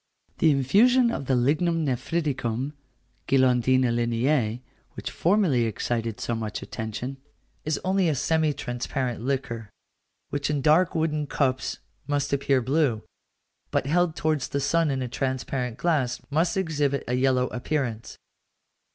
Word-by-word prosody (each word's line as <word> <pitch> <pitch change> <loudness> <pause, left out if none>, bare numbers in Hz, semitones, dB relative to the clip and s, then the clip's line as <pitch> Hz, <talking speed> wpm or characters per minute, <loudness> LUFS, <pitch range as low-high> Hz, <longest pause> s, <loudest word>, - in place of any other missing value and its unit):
The 160 - +5
infusion 230 - +4
of 140 - -4
the 130 - +3
lignum 155 +6 +1
nephriticum 135 -1 -1 0.5
(guilandina 130 -1 +3
Linnæi), 120 0 +1 0.3
which - - -6
formerly 170 - +2
excited 115 0 -2
so 120 - -2
much 110 -2 -4
attention, 110 +5 -5 0.5
is 155 -1 0
only 185 -2 +2
a 150 - +1
semi 160 +3 +1
transparent 125 -2 -3
liquor, 120 -4 -3 0.6
which 145 0 -1
in 145 -2 -1
dark 160 +4 +4
wooden 155 -2 0
cups 130 -1 0 0.3
must 145 -1 -1
appear 135 -2 +2
blue, 130 -4 +1 0.7
but - - 0
held 165 +2 +2
towards 155 -5 0
the 140 - -2
sun 165 +3 +2
in 135 -2 -1
a - - -3
transparent 125 -1 -2
glass 145 -8 0
must 165 +5 +1
exhibit 145 -6 0
a 125 - -1
yellow 130 0 +2
appearance. 125 -3 -3
135 Hz, 135 wpm, -26 LUFS, 125-155 Hz, 0.7 s, The